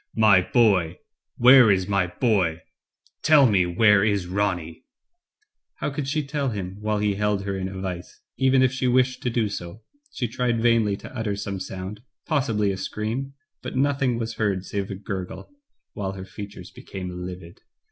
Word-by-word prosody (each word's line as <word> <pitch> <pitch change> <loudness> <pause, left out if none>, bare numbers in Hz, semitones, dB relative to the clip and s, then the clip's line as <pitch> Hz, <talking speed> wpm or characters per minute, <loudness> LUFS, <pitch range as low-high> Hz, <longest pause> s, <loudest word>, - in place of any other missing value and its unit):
'*My 105 -4 +6
boy 95 -6 +2 0.2
— - - -58
where 125 -2 +9
is 95 -2 +2
my 100 -2 +1
boy? 90 -5 0 0.6
Tell 150 -3 +6
me, 95 -7 +3
where 100 +2 +4
is 100 -4 +1
Ronny?" 90 -3 -2 0.9
How - - -3
could 140 0 -4
she 150 +1 -1
tell 140 -1 -1
him 95 -4 -5
while 105 0 -1
he 105 0 +1
held 105 0 0
her 100 0 -3
in 95 -1 -3
a 95 0 -7
vise, 90 -2 -6 0.2
even 130 0 +3
if 130 - +3
she 130 -1 -1
wished 130 +1 +2
to 125 - -1
do 115 -2 0
so. 100 +2 -7 0.3
She 120 - -2
tried 120 0 -1
vainly 115 -3 +2
to - - -11
utter 110 -3 -2
some 100 -1 -4
sound, 95 +3 -6 0.2
possibly 115 -10 +1
a 95 - -4
scream, 115 +8 -4 0.3
but - - -6
nothing 135 -2 +1
was 115 -1 -4
heard 100 -4 0
save 100 -1 -3
a 100 - -4
gurgle, 95 - -6 0.4
while 95 -2 -4
her 95 -1 -8
features 100 +1 -9
became 95 -1 -7
livid. 90 -1 -9
105 Hz, 180 wpm, -24 LUFS, 95-120 Hz, 0.9 s, where